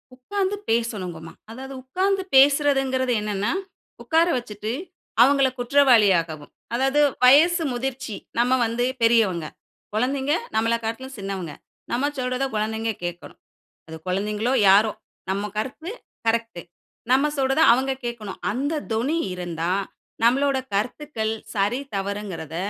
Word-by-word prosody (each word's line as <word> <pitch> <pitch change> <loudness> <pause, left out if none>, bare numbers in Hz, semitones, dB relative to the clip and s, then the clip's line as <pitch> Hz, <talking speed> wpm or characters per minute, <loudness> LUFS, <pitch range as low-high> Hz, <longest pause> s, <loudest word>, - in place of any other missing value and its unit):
உட்கார்ந்து 390 +10 -2
பேசணுங்கம்மா. 185 -8 -2 0.2
அதாவது 265 +3 -8
உட்கார்ந்து 380 +7 0
பேசுறதுங்கிறது 270 -2 +4
என்னன்னா, 210 -1 -1 0.5
உக்கார 330 +1 +3
வச்சுட்டு 215 -2 -5 0.5
அவங்கள 275 +1 +5
குற்றவாளியாகவும் 205 - +3 0.2
அதாவது 270 +4 +2 0.2
வயசு 325 +7 +6
முதிர்ச்சி 255 -3 -4 0.2
நம்ம 250 +2 +3
வந்து 230 +2 -1 0.2
பெரியவங்க, 215 -8 +3 0.5
குழந்தைங்க 265 +5 0 0.2
நம்மளக்காட்டிலும் 230 +3 -1
சின்னவங்க, 195 -6 -5 0.4
நம்ம 275 +5 +1
சொல்றத 255 +1 -1
குழந்தைங்க 220 +1 -1
கேக்கணும். 175 -1 -6 0.5
அது 160 - -7
குழந்தைகளோ, 210 +6 -1 0.2
யாரோ! 205 +2 +5 0.4
நம்ம 200 +2 -1
கருத்து 275 - -4 0.4
கரெக்ட்டு. 230 -5 0 0.5
நம்ப 270 +3 +4
சொல்றத 270 +3 +2
அவங்க 265 +2 +1
கேக்கணும். 225 -5 -6
அந்த 280 +8 -1 0.2
தொனி 250 +9 0 0.2
இருந்தா, 175 -1 -3 0.5
நம்பளோட 275 +3 +3 0.2
கருத்துக்கள் 220 +1 -2 0.2
சரி, 210 +6 +1 0.2
தவறுங்கிறத 195 -5 -4
235 Hz, 105 wpm, -23 LUFS, 205-270 Hz, 0.5 s, வயசு